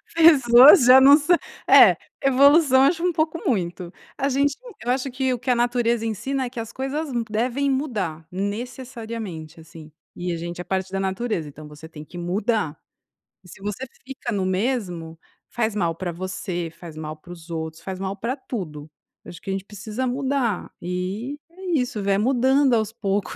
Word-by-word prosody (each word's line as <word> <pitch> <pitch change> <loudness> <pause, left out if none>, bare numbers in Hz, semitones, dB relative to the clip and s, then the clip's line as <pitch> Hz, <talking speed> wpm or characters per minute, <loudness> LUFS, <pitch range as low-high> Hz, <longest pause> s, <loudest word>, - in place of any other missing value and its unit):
Pessoas 275 -3 +8
já 255 +1 +9
não 280 +2 +8
sã 320 +4 +3 0.3
é - - +8 0.3
evolução 275 0 +5
acho 335 +4 +2
um 360 - +2
pouco 315 0 -1
muito, 180 -5 -2 0.2
a 275 - 0
gente 280 +1 +1 0.3
eu 245 - -1
acho 260 +1 -1
que 260 0 -1
o - - -4
que 245 +2 -3
a 250 - +5
natureza 240 -1 +1
ensina 265 +5 -2
é - - -6
que 245 - -9
as 225 - -7
coisas 270 +2 -3
mu 235 -1 0
devem 250 +6 0
mudar 205 - -2
necessariamente, 220 -5 -6
assim, 160 -1 -13 0.2
e 175 0 -3
a - - -2
gente 170 +1 -6
é - - -5
parte 190 +1 -2
da 195 - -1
natureza, 190 -4 -2
então 150 +1 -11
você 150 +2 -12
tem 155 -2 -11
que 175 +3 -11
mudar. 185 -2 -1 0.7
E - - -17
se 190 - -14
você 210 +6 -4 0.2
fica 265 -2 -6
no 195 -3 -1
mesmo, 185 -6 -2 0.3
faz 220 -3 -1
mal 170 -5 0
pra 175 0 -4
você, 175 -1 -4
faz 165 -3 -11
mal 155 0 -6
para 165 +3 -15
os 170 -1 -12
outros, 160 0 -5
faz 190 -1 -6
mal 195 0 -3
pra 235 +6 -3
tudo. 155 - -7 0.3
Eu - - -12
acho 170 - -11
que - - -8
a - - 0
gente 195 -1 -3
precisa 215 +5 -5
mudar, 260 -5 -1
e 190 +10 -4
é 360 -1 -2
isso, 235 -4 -3
vai 195 0 +2
mudando 260 +3 +3
aos 220 -2 +1
poucos, 200 -3 -2
220 Hz, 190 wpm, -23 LUFS, 180-260 Hz, 0.7 s, já